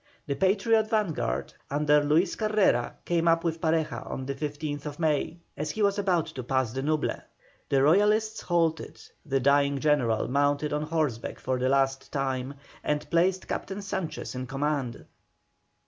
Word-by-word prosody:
The 140 - -1
Patriot 215 +6 +2
vanguard 160 - -1 0.2
under 150 +1 +3
Luis 155 +6 +2
Carrera 210 - +2
came 170 -1 +1
up 165 0 +4
with 165 -1 -2
Pareja 160 -1 0
on 130 - -5
the 140 - -2
15th 145 0 -4
May, 160 0 0 0.2
as 150 +1 -3
he 215 +7 -1
was 200 0 +2
about 180 -5 +2
to 130 - -7
pass 130 -2 0
the 135 - -2
Nuble. 155 +1 0 0.5
The 135 -1 +3
Royalists 210 +7 +3
halted, 165 -2 0 0.2
the 135 -3 0
dying 140 +1 +3
general 130 -7 +2
mounted 145 +3 +1
on 150 - 0
horseback 150 -7 -2
for 130 -1 -1
the 130 +1 +1
last 135 0 +1
time, 135 -1 -2 0.3
and 150 0 -1
placed 180 +3 +2
Captain 200 +1 -4
Sanchez 190 -4 -4
in 130 0 -5
command. 135 -3 -2
150 Hz, 155 wpm, -27 LUFS, 135-170 Hz, 0.5 s, up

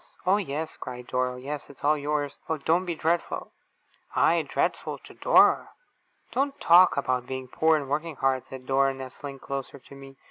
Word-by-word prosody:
'Oh, 190 +2 +4
yes!' 160 -5 -4
cried 125 -1 -7
Dora. 125 0 -1
'Oh, - - -9
yes, 140 +3 -6
it's 140 - -15
all 150 +2 +4
yours. 145 -1 -2
Oh, 160 - 0
don't 165 +5 +1
be 170 -2 -2
dreadful!' 165 +2 -1 0.6
I - - +4
dreadful! - - -2
To - - -15
Dora! - - +4 0.6
'Don't 275 +1 -1
talk 175 0 +6
about 130 -3 0
being 130 -1 -5
poor, 160 +5 +3
and 145 -2 -5
working 155 +3 -2
hard!' 130 -1 +1
said 130 -1 -9
Dora, 135 0 +2
nestling 135 +1 -8
closer 135 0 -6
to 140 - -16
me. 135 0 -12
140 Hz, 180 wpm, -27 LUFS, 130-160 Hz, 0.6 s, talk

